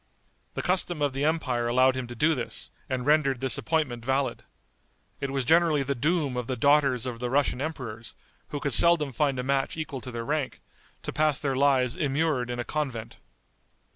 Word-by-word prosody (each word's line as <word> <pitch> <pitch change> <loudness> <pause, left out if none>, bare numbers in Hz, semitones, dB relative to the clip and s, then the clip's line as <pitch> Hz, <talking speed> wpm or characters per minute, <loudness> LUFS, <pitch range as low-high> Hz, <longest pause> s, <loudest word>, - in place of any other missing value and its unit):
The - - -3
custom 180 -2 +1
of 140 -2 0
the 135 +2 -1
empire 130 -7 0
allowed 130 +2 +3
him 130 -2 -4
to 120 - -8
do 155 +7 +3
this, 125 -5 -4 0.2
and 125 -1 -2
rendered 145 -3 +2
this 130 -3 +2
appointment 150 -8 -1
valid. 135 +2 -1 0.8
It 140 - -3
was 135 -2 -2
generally 160 -1 +3
the 140 +1 -1
doom 145 +1 0
of 125 -1 -3
the 130 - -2
daughters 140 -1 +3
of 120 -2 -5
the 125 0 -3
Russian 135 -1 +1
emperors, 125 -8 -6 0.3
who 145 - -5
could 140 -2 -2
seldom 160 +1 +6
find 140 +1 0
a 125 - -2
match 135 +3 -1
equal 150 -4 -5
to 125 - -8
their 115 -1 -5
rank, 150 -1 -2 0.4
to - - -5
pass 155 -2 +2
their 135 -2 -1
lives 130 -2 +2
immured 140 -3 0
in 120 - -3
a 120 - -2
convent. 120 -7 -4
135 Hz, 195 wpm, -27 LUFS, 125-150 Hz, 0.8 s, seldom